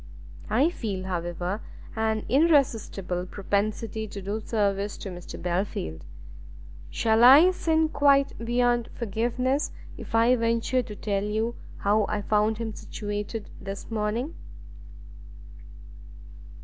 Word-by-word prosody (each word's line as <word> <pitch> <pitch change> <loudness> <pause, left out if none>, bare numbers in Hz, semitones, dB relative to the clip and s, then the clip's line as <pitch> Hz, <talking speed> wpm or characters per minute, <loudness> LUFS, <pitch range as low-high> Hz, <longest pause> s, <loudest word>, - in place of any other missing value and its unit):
I 310 +5 +3
feel, 200 - -4
however, 175 +2 -3 0.3
an 220 -1 0
irresistible 225 - +2
propensity 215 +3 -2
to 200 - -7
do 200 +3 -3
service 205 -2 -1
to 195 - -6
Mr 175 -1 -8
Belfield; 175 - -3 0.8
shall 225 +1 +2
I 290 +9 +9
sin 320 -3 +1
quite 280 -2 +3
beyond 240 0 +1
forgiveness 240 +5 -1 0.3
if - - -6
I 230 +2 +5
venture 230 +2 +1
to 215 -3 -8
tell 200 -2 -1
you 220 +3 -1 0.2
how 210 +1 +2
I 205 - -2
found 215 +1 +2
him 225 -1 -4
situated 205 +1 -5
this 195 +3 -7
morning?" 225 +7 -1
220 Hz, 110 wpm, -26 LUFS, 200-240 Hz, 0.8 s, I